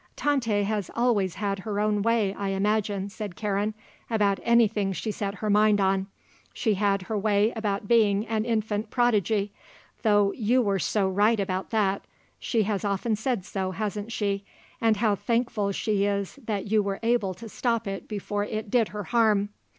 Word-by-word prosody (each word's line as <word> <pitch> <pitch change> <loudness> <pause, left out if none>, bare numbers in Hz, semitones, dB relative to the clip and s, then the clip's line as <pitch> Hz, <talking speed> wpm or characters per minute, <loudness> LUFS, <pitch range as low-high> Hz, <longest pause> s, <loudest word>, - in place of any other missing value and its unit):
"Tante 235 -8 +1
has 205 -2 -2
always 215 -7 +1
had 200 -1 -2
her 205 +1 -3
own 210 -1 +1
way, 220 -3 +2
I 200 0 -4
imagine," 200 0 0
said 205 -3 -6
Karen, 210 +1 -1 0.3
"about 205 -4 +2
anything 220 -4 +3
she 215 +4 -3
set 200 -1 -3
her 215 +1 -3
mind 210 0 +4
on. 195 0 +1 0.5
She 220 - +1
had 200 -1 +1
her 220 +4 -4
way 210 +2 +2
about 205 -2 -2
being 215 -3 +3
an 220 -1 -1
infant 220 -2 -1
prodigy; 215 -4 +1 0.5
though 205 -3 +3
you 235 +4 +1
were 200 -2 +1
so 200 +1 +1
right 205 +4 +3
about 190 -1 -2
that 200 -3 +1 0.4
she 225 -3 +1
has 200 -2 -2
often 205 +2 0
said 220 -3 -2
so, 190 -2 -3
hasn't 210 +2 -4
she, 200 -3 -1 0.4
and 225 -2 +3
how 215 0 +2
thankful 230 -2 0
she 200 0 0
is 200 +5 -2
that 205 -4 -2
you 215 -1 +4
were 200 -1 -3
able 225 -5 +1
to 230 - -9
stop 230 +1 -1
it 195 0 -5
before 205 0 -3
it 215 0 -4
did 235 -4 +3
her 210 0 -6
harm. 215 -2 +2
210 Hz, 175 wpm, -26 LUFS, 200-220 Hz, 0.5 s, mind